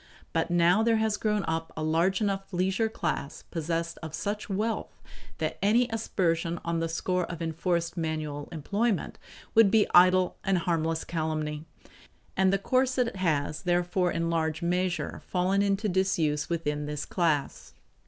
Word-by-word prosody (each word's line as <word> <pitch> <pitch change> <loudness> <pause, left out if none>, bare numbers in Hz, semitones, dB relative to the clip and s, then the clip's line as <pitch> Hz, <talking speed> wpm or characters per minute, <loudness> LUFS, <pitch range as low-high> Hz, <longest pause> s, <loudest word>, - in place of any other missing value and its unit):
But 165 +1 0
now 175 +4 +4
there 225 0 +3
has 220 -1 +1
grown 210 -1 0
up 160 0 -2
a 155 - -2
large 170 +6 +2
enough 195 -1 -1
leisure 190 +4 +1
class 145 -9 -3
possessed 165 0 -3
of 160 -1 -6
such 210 +1 -3
wealth 215 +3 -2 0.4
that - - -3
any 230 +5 +4
aspersion 170 -6 0
on 170 0 0
the 165 0 -1
score 180 +2 -1
of 170 -1 -7
enforced 170 +1 -1
manual 155 -3 -3
employment 200 +7 -1 0.3
would 225 -3 +6
be 215 0 +4
idle 185 0 +5
and 195 -1 +2
harmless 165 -2 0
calumny; 155 -2 -3 0.7
and 190 0 +3
the 195 - +3
corset 255 +1 +1
has 155 -4 0
therefore 175 0 +1
in 165 0 -1
large 160 0 -1
measure 180 +1 -1
fallen 185 +2 +1
into 200 +1 +1
disuse 175 -6 +1
within 150 -3 -2
this 150 -1 -4
class. 160 -6 -1
175 Hz, 150 wpm, -28 LUFS, 160-195 Hz, 0.7 s, would